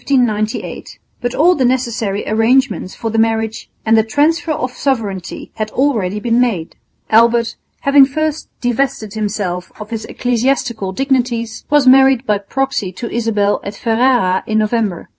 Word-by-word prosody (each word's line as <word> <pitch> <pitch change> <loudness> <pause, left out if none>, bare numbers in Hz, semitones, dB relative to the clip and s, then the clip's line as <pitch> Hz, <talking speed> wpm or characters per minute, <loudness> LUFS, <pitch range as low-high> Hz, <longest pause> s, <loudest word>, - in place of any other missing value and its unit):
But 245 0 -2
all 345 +5 +5
the 275 - 0
necessary 235 -5 -1
arrangements 225 -1 +1
for 225 -2 -4
the 225 - 0
marriage 225 0 -1 0.2
and 225 0 +4
the 220 - +5
transfer 300 +9 +1
of 255 -4 -2
sovereignty 225 -9 -3
had 215 0 -2
already 215 -7 0
been 235 +2 +1
made. 195 -10 -1 0.4
Albert, 235 +1 +3 0.3
having 275 -1 +6
first 310 +2 -3
divested 245 -4 -1
himself 200 -5 -3
of 215 +1 -9
his 220 -1 -4
ecclesiastical 240 -4 -1
dignities, 240 -2 -1
was 295 -2 +4
married 265 -1 +5
by 210 -3 +1
proxy 265 -1 -2
to 235 +6 -6
Isabel 215 -3 0
at 200 - -6
Ferrara 230 -5 +1
in 220 - 0
November. 215 -4 -1
230 Hz, 140 wpm, -16 LUFS, 215-265 Hz, 0.4 s, having